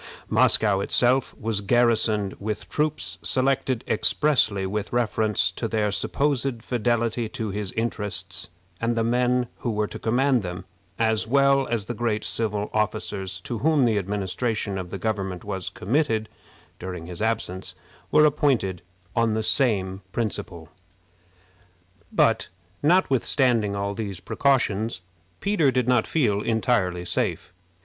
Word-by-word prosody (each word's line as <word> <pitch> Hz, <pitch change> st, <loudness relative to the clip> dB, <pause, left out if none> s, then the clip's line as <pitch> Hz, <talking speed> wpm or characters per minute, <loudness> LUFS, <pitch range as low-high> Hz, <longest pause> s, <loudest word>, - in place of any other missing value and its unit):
Moscow 105 Hz, -3 st, +4 dB
itself 125 Hz, +5 st, +2 dB
was 110 Hz, -2 st, -1 dB
garrisoned 110 Hz, -2 st, +2 dB
with 105 Hz, 0 st, -4 dB
troops 155 Hz, 0 st, -1 dB
selected 130 Hz, -1 st, 0 dB
expressly 125 Hz, -10 st, +2 dB
with 100 Hz, +1 st, -3 dB
reference 110 Hz, -3 st, +1 dB
to 115 Hz, -, -3 dB
their 110 Hz, -2 st, 0 dB
supposed 135 Hz, +2 st, -1 dB
fidelity 120 Hz, -1 st, 0 dB
to 110 Hz, -2 st, -4 dB
his 100 Hz, -1 st, -3 dB
interests, 95 Hz, -6 st, -3 dB, 0.3 s
and 115 Hz, 0 st, +1 dB
the 115 Hz, -, +2 dB
men 125 Hz, +1 st, +2 dB
who 120 Hz, -, -2 dB
were 105 Hz, -1 st, 0 dB
to -, -, -8 dB
command 125 Hz, +2 st, +2 dB
them, 90 Hz, -1 st, -6 dB, 0.3 s
as 110 Hz, -1 st, +1 dB
well 140 Hz, +1 st, +3 dB
as 115 Hz, -4 st, -2 dB
the 120 Hz, -, -4 dB
great 110 Hz, -2 st, -1 dB
civil 105 Hz, -2 st, -2 dB
officers 100 Hz, -3 st, -2 dB
to 115 Hz, +3 st, -4 dB
whom 155 Hz, -3 st, +3 dB
the 110 Hz, -3 st, +2 dB
administration 100 Hz, +1 st, -2 dB
of 90 Hz, -1 st, -6 dB
the -, -, -5 dB
government 95 Hz, -5 st, -3 dB
was 95 Hz, -3 st, -4 dB
committed 110 Hz, -, 0 dB, 0.5 s
during 90 Hz, -3 st, -6 dB
his 90 Hz, +1 st, -7 dB
absence, 110 Hz, -4 st, -2 dB, 0.3 s
were 150 Hz, -, +6 dB
appointed 130 Hz, -, +1 dB, 0.3 s
on 115 Hz, -2 st, +2 dB
the 110 Hz, -, -1 dB
same 100 Hz, -7 st, +2 dB
principle. 95 Hz, -7 st, -3 dB, 1.4 s
But, -, -, +2 dB, 0.3 s
notwithstanding 130 Hz, -, +2 dB
all 100 Hz, 0 st, -2 dB
these 100 Hz, -4 st, -5 dB
precautions, 115 Hz, -5 st, +1 dB, 0.4 s
Peter 195 Hz, -8 st, +2 dB
did 125 Hz, -2 st, 0 dB
not 125 Hz, -3 st, +3 dB
feel 105 Hz, -10 st, +1 dB
entirely 105 Hz, -7 st, 0 dB
safe. 90 Hz, +1 st, -2 dB
110 Hz, 130 wpm, -25 LUFS, 100-125 Hz, 1.4 s, were